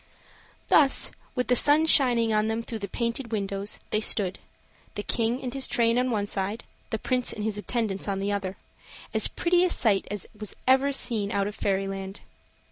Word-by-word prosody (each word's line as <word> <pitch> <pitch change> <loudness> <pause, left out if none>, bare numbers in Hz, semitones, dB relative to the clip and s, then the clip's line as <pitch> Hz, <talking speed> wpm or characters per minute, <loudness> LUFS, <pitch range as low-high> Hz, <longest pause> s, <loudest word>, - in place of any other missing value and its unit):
Thus, 280 -3 +5 0.2
with 250 -1 -1
the 250 - +3
sun 295 +5 +6
shining 240 -7 +3
on 215 0 +2
them 225 +1 -2
through 230 -1 -6
the 200 - -5
painted 235 +3 -3
windows, 200 -1 -3
they 215 - +2
stood; 200 -3 +2 0.6
the 205 - -4
king 230 +3 0
and 250 -1 -4
his 270 -1 -2
train 230 0 +2
on 255 0 0
one 210 -4 -1
side, 205 +3 -3 0.3
the 220 - -2
Prince 250 +3 -1
and 210 - -5
his 210 -1 -2
attendants 215 -3 -2
on 195 -1 -2
the 200 +1 -1
other, 195 -2 -3 0.6
as - - +4
pretty 350 +1 +1
a 365 - +2
sight 215 - +1
as 205 -2 -5 0.4
ever 265 +2 +4
was 280 - -1
seen 215 -5 -1
out 200 -3 0
of 205 - -4
fairyland. 195 -1 -3
220 Hz, 190 wpm, -26 LUFS, 200-250 Hz, 0.6 s, sun